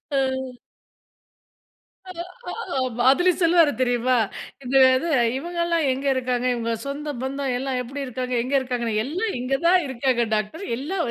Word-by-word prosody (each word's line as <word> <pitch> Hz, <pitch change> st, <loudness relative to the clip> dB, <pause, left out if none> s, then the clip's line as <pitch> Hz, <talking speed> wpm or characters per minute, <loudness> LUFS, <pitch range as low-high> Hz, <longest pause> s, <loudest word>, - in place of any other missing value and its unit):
அ. -, -, +3 dB, 1.9 s
அ -, -, -5 dB, 0.7 s
ஆமா 250 Hz, -2 st, -1 dB
அதுல 355 Hz, +6 st, +4 dB
சொல்வாரு 335 Hz, -3 st, +5 dB
தெரியுமா, 245 Hz, 0 st, +2 dB, 0.5 s
"இந்த 260 Hz, +2 st, +1 dB, 0.2 s
இது 330 Hz, +6 st, -1 dB, 0.3 s
இவங்கலாம் 340 Hz, +1 st, -1 dB
எங்கே 270 Hz, +2 st, -2 dB
இருக்காங்க? 250 Hz, -1 st, -1 dB
இவங்க 230 Hz, -1 st, -2 dB
சொந்த 290 Hz, +2 st, -4 dB
பந்தம் 265 Hz, 0 st, -2 dB
எல்லாம் 260 Hz, 0 st, -2 dB
எப்படி 275 Hz, +3 st, -5 dB
இருக்காங்க? 255 Hz, 0 st, -4 dB
எங்கே 275 Hz, +2 st, +1 dB
இருக்காங்கன்னு, 245 Hz, -4 st, -2 dB
எல்லா 355 Hz, -, -2 dB
இங்கே 255 Hz, +2 st, 0 dB
தான் 365 Hz, +1 st, +6 dB
இருக்காங்க 250 Hz, -2 st, 0 dB
டாக்டர். 215 Hz, -, -3 dB
எல்லா 305 Hz, +9 st, -4 dB
265 Hz, 135 wpm, -23 LUFS, 250-300 Hz, 1.9 s, தான்